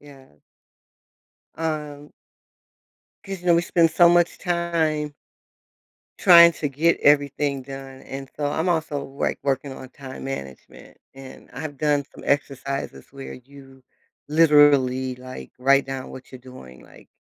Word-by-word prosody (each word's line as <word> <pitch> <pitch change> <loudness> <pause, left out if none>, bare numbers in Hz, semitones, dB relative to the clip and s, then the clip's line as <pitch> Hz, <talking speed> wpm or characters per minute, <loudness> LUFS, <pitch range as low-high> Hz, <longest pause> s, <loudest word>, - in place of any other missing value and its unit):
yeah. 140 -2 -16 1.3
Um 150 -2 -5 1.1
'cause, 195 -2 -6
you 180 - -11
know 175 - +5
we 170 - +2
spend 170 -2 +2
so 175 +2 +5
much 175 0 +2
time 165 -4 -1 1.1
trying 170 -1 +8
to 155 -3 -4
get 155 +5 +1
everything 145 -1 +2
done. 135 0 -10
And 135 0 -8
so 145 - -2
I'm 160 +4 -1
also, 160 -4 -1
like, 135 +1 -3
working 140 0 -1
on 130 - -10
time 130 0 -10
management 70 - -9 0.2
and 135 -1 -13
I've 145 -3 -7
done 145 -1 +1
some - - -13
exercises 140 -1 -3
where 135 -1 -9
you 135 +1 -16 0.5
literally, 145 -5 +4
like, 130 +1 -10
write 140 +1 +3
down 135 -1 -6
what 130 0 -12
you're 130 - -10
doing, 65 - -13
like, - - -18
140 Hz, 135 wpm, -23 LUFS, 135-155 Hz, 1.3 s, trying